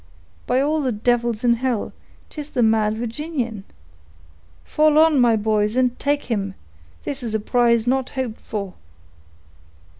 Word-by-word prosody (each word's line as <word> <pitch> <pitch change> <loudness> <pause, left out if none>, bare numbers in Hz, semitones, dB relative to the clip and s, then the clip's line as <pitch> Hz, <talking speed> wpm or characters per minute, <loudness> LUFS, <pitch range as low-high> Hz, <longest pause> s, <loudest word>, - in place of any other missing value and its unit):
"By 255 - +2
all 305 +2 +1
the 260 -3 0
devils 235 +1 0
in 240 -1 +4
hell, 250 -3 -2 0.4
'tis 300 -1 -7
the 250 -4 0
mad 220 -1 +2
Virginian!—fall 205 - -4
on, 310 -4 +5
my 235 -2 +4
boys, 210 0 0
and 250 -1 +1
take 285 0 0
him; 200 -5 -3 0.5
this 275 -1 -4
is 225 -3 -3
a - - +1
prize 235 +1 +2
not 260 +1 0
hoped 255 -4 -4
for!" 200 -4 -5
235 Hz, 140 wpm, -21 LUFS, 210-260 Hz, 0.5 s, on